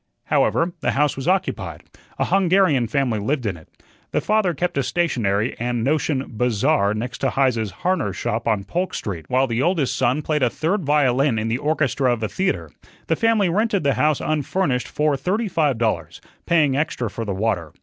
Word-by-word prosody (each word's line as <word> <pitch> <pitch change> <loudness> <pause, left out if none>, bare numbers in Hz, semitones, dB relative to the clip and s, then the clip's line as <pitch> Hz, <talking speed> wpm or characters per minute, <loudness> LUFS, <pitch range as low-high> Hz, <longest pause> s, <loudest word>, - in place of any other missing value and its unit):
However, 170 +1 +1
the - - 0
house 145 +1 +1
was 135 +3 -5
occupied. 190 +1 -1 0.3
A - - +1
Hungarian 185 -9 +3
family 120 -2 0
lived 130 +4 -1
in 100 -4 -1
it. 80 -2 -15 0.4
The - - 0
father 210 -6 +1
kept 175 +6 -2
a - - +3
stationery 120 - 0
and 120 -1 -1
notion 140 0 0
"bazaar" 120 -1 +1
next 120 +3 -4
to - - +1
Heise's 125 -6 +1
harness 165 - -1
shop 115 +2 -2
on 105 -3 +1
Polk 180 - -2
Street, 85 -7 -5
while 130 +1 +3
the 120 -1 -1
oldest 160 -3 +1
son 130 +4 +1
played 150 -1 0
a 125 - +3
third 175 - -1
violin 140 -3 +2
in 110 +1 -1
the 120 +3 -1
orchestra 140 -4 +1
of 115 -2 -2
a - - +1
theatre. 190 0 -2 0.3
The - - +1
family 225 -4 +2
rented 205 +1 +1
the 140 -1 +2
house 150 -1 +1
unfurnished 150 -2 -1
for 150 -1 +1
thirty 190 - -1
five 150 - +1
dollars, 110 -9 -2 0.3
paying 150 -5 +3
extra 140 -4 -1
for 110 +3 -5
the 100 -3 -3
water. 95 -7 -1
135 Hz, 190 wpm, -22 LUFS, 115-165 Hz, 0.4 s, Hungarian